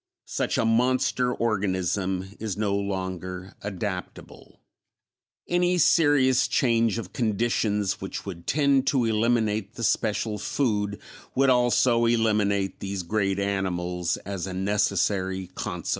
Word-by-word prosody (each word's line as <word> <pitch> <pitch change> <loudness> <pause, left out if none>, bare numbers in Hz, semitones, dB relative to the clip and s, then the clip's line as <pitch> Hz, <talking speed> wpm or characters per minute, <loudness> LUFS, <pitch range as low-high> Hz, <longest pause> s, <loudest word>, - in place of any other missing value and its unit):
Such - - -1
a 115 - +2
monster 125 +2 +2
organism 95 -4 -1
is 105 -3 -4
no 105 -2 0
longer 95 -2 -4
adaptable; 100 -2 -6 0.9
any 175 +1 +2
serious 135 -6 +4
change 115 -3 +2
of 105 -6 -6
conditions 105 -3 0
which 95 - -5
would 85 -4 -8
tend 140 -2 +2
to 135 -3 +2
eliminate 110 -1 0
the 115 - -6
special 110 -1 0
food 105 -4 -1 0.4
would 135 0 +4
also 120 -1 +3
eliminate 105 -4 +1
these 100 -1 -4
great 100 +1 0
animals 90 -3 -1
as 100 -2 -4
a 95 - -5
necessary 95 -1 0
consequence. - - -5
105 Hz, 115 wpm, -26 LUFS, 95-120 Hz, 0.9 s, serious